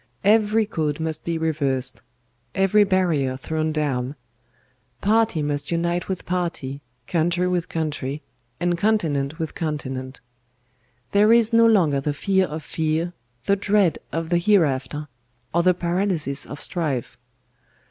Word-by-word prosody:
Every 215 +1 +4
code 155 -6 -2
must 160 -1 -3
be 170 -1 -1
reversed; 140 -5 -1 0.5
every 195 +2 +4
barrier 165 -9 +1
thrown 155 +3 -2
down; 140 -3 -1 0.8
party 215 -6 +2
must 145 0 -2
unite 170 +1 -1
with 190 -2 -4
party, 170 -6 -3 0.2
country 175 +3 +1
with 180 -2 -1
country, 150 -2 -3 0.4
and 175 0 +1
continent 160 -9 +1
with 160 -2 -4
continent. 135 -5 -4 0.9
There 210 +2 +5
is 230 0 +5
no 230 0 +6
longer 165 -11 +3
the 145 +1 -2
fear 190 +3 +2
of 155 +1 -6
fear, 160 +3 -1 0.3
the 200 - +3
dread 200 -3 +2
of 165 0 -3
the 175 - +3
hereafter, 150 -6 +1 0.5
or 170 - +3
the 180 +1 +4
paralysis 175 -5 -1
of 145 - -7
strife. 145 -10 -2
165 Hz, 130 wpm, -23 LUFS, 145-190 Hz, 0.9 s, no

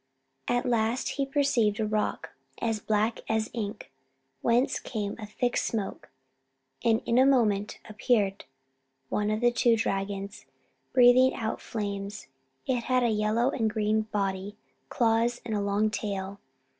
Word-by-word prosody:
At 245 0 +1
last 235 0 +1
he 275 -1 -2
perceived 255 -7 +1
a 220 - +1
rock, 215 0 -2 0.3
as 225 -2 -1
black 215 +2 0
as 220 0 0
ink, 215 -2 -5 0.5
whence 240 +3 +2
came 210 -4 -4
a 215 - -6
thick 245 +3 -1
smoke; 210 -4 -2 0.7
and 225 -2 +2
in 235 +2 +3
a - - +7
moment 215 -6 +2
appeared 215 -2 0 0.6
one 210 0 0
of 215 +1 -1
the 240 0 +4
two 240 -1 +3
dragons, 195 -2 -3 0.4
breathing 255 +1 +6
out 225 -2 -3
flames. 200 -1 -5 0.4
It 245 -3 -1
had 255 -1 +2
a 240 - +3
yellow 220 +4 +1
and 225 -6 0
green 215 0 +1
body, 195 0 -2 0.3
claws, 235 +1 +1
and 225 - -3
a 205 - 0
long 200 +2 +1
tail. 200 -2 -4
220 Hz, 145 wpm, -28 LUFS, 205-240 Hz, 0.7 s, a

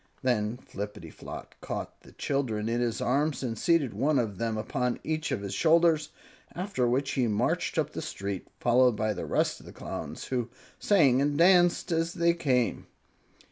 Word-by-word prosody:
Then 120 -3 +1
Flippityflop 100 -8 -8
caught - - -6
the - - -16
children 120 -7 -1
in 120 +1 0
his 120 -2 -1
arms 140 +3 0
and 115 -3 -2
seated 165 -2 +2
one 150 +1 +1
of 105 -6 -1
them 115 -1 -1
upon 125 +3 -1
each 155 -1 -2
of 125 -6 -1
his 100 -1 -5
shoulders, 160 - +3 0.5
after 180 -9 -1
which 135 +3 0
he 125 -3 +1
marched 105 -1 0
up - - +1
the - - -5
street, 100 -1 -5
followed 125 0 +4
by 110 0 0
the 95 - -5
rest - - 0
of - - -15
the - - -9
Clowns, - - -6
who 125 -3 -2 0.3
sang 140 -11 +4
and 145 0 +1
danced 175 0 +4
as 165 +1 0
they 170 -1 +3
came. 130 -8 0
130 Hz, 175 wpm, -28 LUFS, 115-155 Hz, 0.5 s, followed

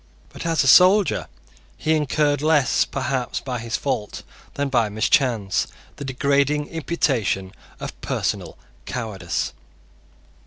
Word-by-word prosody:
But - - -7
as 165 -2 +2
a - - 0
soldier 185 +7 +6 0.5
he 160 - +1
incurred, 150 -1 +1
less 150 -3 +3
perhaps 130 -2 -2
by 125 -2 -4
his 115 +1 -2
fault 110 -7 -3 0.3
than 145 0 0
by 120 -5 +2
mischance, 110 -1 +1 0.3
the - - -6
degrading 140 +2 +1
imputation 130 - -1 0.3
of - - -7
personal - - -2 0.3
cowardice. 100 -8 -3
135 Hz, 115 wpm, -22 LUFS, 115-150 Hz, 0.5 s, soldier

